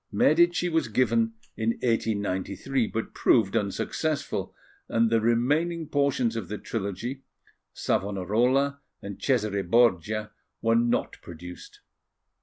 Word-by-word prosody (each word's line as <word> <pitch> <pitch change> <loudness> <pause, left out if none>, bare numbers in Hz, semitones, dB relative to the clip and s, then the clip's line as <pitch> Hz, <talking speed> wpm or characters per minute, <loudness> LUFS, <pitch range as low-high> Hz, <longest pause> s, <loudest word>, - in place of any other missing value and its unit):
Medici 170 +3 +3
was 160 -5 +1
given 115 0 +1 0.2
in 115 +1 0
1893, 110 +1 0
but 115 - -4
proved 110 -5 +3
unsuccessful, 145 +9 -2 0.4
and 115 0 +2
the 115 -1 +3
remaining 145 +9 +1
portions 140 -5 +1
of 110 -6 -4
the 105 - -4
trilogy, 115 +6 -4 0.5
Savonarola 120 +9 0 0.2
and 100 -1 -7
Cesare 110 -7 +1
Borgia, 105 +1 +2 0.3
were 115 0 +2
not 120 +1 0
produced. 90 +1 -11
115 Hz, 105 wpm, -27 LUFS, 100-135 Hz, 0.5 s, Medici